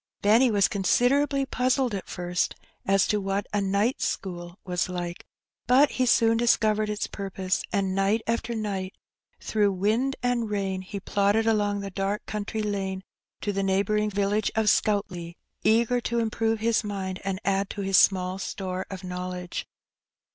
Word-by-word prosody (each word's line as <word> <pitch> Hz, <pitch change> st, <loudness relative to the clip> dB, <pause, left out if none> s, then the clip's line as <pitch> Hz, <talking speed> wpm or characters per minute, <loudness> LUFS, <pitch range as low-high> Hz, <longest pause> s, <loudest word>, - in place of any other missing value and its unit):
Benny 225 Hz, +5 st, +5 dB
was 205 Hz, -3 st, +3 dB
considerably 275 Hz, +8 st, +2 dB
puzzled 255 Hz, -2 st, +1 dB
at 195 Hz, -, -4 dB
first 175 Hz, 0 st, -1 dB, 0.3 s
as 195 Hz, 0 st, +4 dB
to 210 Hz, -1 st, 0 dB
what 195 Hz, +1 st, -1 dB
a 205 Hz, -, +2 dB
^' -, -, 0 dB
night 200 Hz, +6 st, +1 dB
school 175 Hz, -1 st, -4 dB
" -, -, -49 dB
was 180 Hz, -1 st, -1 dB
like; 175 Hz, -1 st, -5 dB, 0.4 s
but 270 Hz, +4 st, +5 dB
he 255 Hz, -1 st, 0 dB
soon 230 Hz, -1 st, +4 dB
discovered 215 Hz, -2 st, +2 dB
its 210 Hz, 0 st, -2 dB
purpose, 195 Hz, -1 st, -2 dB
and 195 Hz, -2 st, 0 dB
night 195 Hz, +3 st, +1 dB
after 230 Hz, 0 st, -1 dB
night, 195 Hz, -4 st, -3 dB, 0.4 s
through 205 Hz, -2 st, +1 dB
wind 220 Hz, +8 st, +1 dB
and 245 Hz, -3 st, 0 dB
rain, 195 Hz, -2 st, -2 dB
he 195 Hz, +2 st, -6 dB
plodded 205 Hz, +3 st, +1 dB
along 205 Hz, -2 st, +1 dB
the 200 Hz, 0 st, -6 dB
dark 195 Hz, +2 st, -2 dB
country 215 Hz, +1 st, -3 dB
lane 195 Hz, -2 st, -2 dB, 0.4 s
to 205 Hz, -, -1 dB
the 195 Hz, -, -1 dB
neighbouring 200 Hz, +2 st, +1 dB
village 205 Hz, +1 st, 0 dB
of 220 Hz, -1 st, +3 dB
Scoutleigh, 180 Hz, -5 st, 0 dB, 0.3 s
eager 235 Hz, +2 st, +3 dB
to 235 Hz, 0 st, -2 dB
improve 225 Hz, -1 st, 0 dB
his 230 Hz, +1 st, +2 dB
mind 190 Hz, -3 st, -4 dB
and 195 Hz, -1 st, -2 dB
add 195 Hz, 0 st, +1 dB
to 205 Hz, -, -5 dB
his 195 Hz, -1 st, +3 dB
small 185 Hz, 0 st, +2 dB
store 185 Hz, -1 st, -4 dB
of 190 Hz, -1 st, -7 dB
knowledge. 180 Hz, 0 st, -5 dB
205 Hz, 165 wpm, -26 LUFS, 190-225 Hz, 0.4 s, Benny